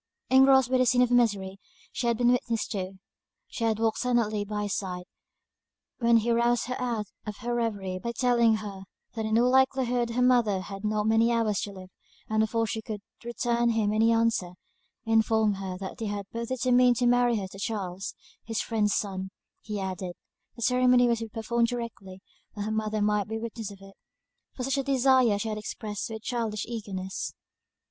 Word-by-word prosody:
Engrossed 265 -1 +6
by 255 - +3
the 255 - +4
scene 250 0 +5
of 245 - 0
misery 205 -6 +1 0.3
she 240 - -2
had 235 -1 +2
been 245 0 +4
witness 235 -3 0
to, 190 -3 -4 0.5
she 230 -1 -1
walked 225 0 0
silently 230 -4 +1
by 210 0 -3
his 205 -1 -1
side, 180 -2 -4 1.0
when 235 -1 +5
he 230 +1 +1
roused 235 0 +2
her 255 +1 -4
out 235 -4 -1 0.2
of 210 -1 -5
her 240 +1 -2
reverie 205 -6 -2
by 235 +4 -3
telling 235 -2 +3
her 205 -3 -6 0.3
that 220 -1 -3
in 220 +1 +2
all 245 +2 +4
likelihood 260 -2 +2
her 245 +2 +1
mother 235 -6 +3
had 195 +1 -8
not 210 0 0
many 225 +2 +3
hours 225 -3 +1
to 205 - -4
live; 185 -1 -11 0.4
and 220 0 0
before 225 +1 +1
she 220 0 -3
could 215 -2 -6 0.2
return 235 0 0
him 220 -2 +1
any 225 +1 +4
answer, 225 -6 +1 0.5
informed 220 -2 +2
her 190 -2 -5
that 190 0 -7
they 225 - -2
had 205 -1 -4
both 230 0 -4
determined 250 0 +3
to 245 - 0
marry 245 0 +4
her 200 - -3
to 195 +1 -12
Charles, 195 -3 -4 0.3
his 225 0 -3
friend's 210 -3 0
son; 190 -2 -3 0.3
he 210 -2 -5
added, 185 -2 -4 0.4
the 235 - -6
ceremony 250 0 +4
was 235 -1 +1
to 225 - -4
be - - -12
performed 230 +1 0
directly, 230 -6 -6 0.3
that 205 - -3
her 215 - -3
mother 215 -1 -1
might 210 -1 +1
be 220 +1 -3
witness 225 -1 -5
of 200 - -11
it; 195 0 -14 0.6
for 255 - -4
such 270 +2 0
a - - 0
desire 260 -5 +4
she 220 +2 -3
had 215 0 -3
expressed 210 -1 -5
with 220 -1 -7
childish 225 -4 -2
eagerness. 195 -5 -5
225 Hz, 195 wpm, -27 LUFS, 205-240 Hz, 1.0 s, Engrossed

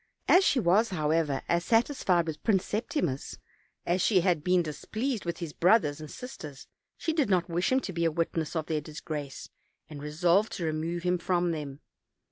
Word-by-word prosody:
As 370 - +6
she 280 - +3
was.* 210 +3 +3
how 155 -5 -1
ever, 155 -4 0
as 170 0 +1
satisfied 225 - +2
with 160 -2 -5
Prince 195 -5 +2
Septimus 205 - -2 0.5
as 180 +2 +1
she 190 -2 +4
had 170 -4 +1
been 180 0 +3
displeased 215 - -3
with 170 -1 -3
his 165 -4 -6
brothers 170 -6 +3
and 155 - -8
sisters, 155 - -9 0.3
she 325 - -1
did 295 -9 +1
not 180 -2 +1
wish 175 +6 0
him 260 - +4
to 190 - -5
be 170 0 0
a 165 - +2
witness 165 0 -2
of 160 -2 -1
their 155 -1 -1
disgrace, 150 -2 -7 0.4
and 145 -2 -9
resolved 170 +8 +2
to 170 - -3
re 160 - 0
move 165 +2 -3
him 180 0 +1
from 175 0 +1
them. 145 -3 -6
170 Hz, 195 wpm, -28 LUFS, 155-190 Hz, 0.5 s, As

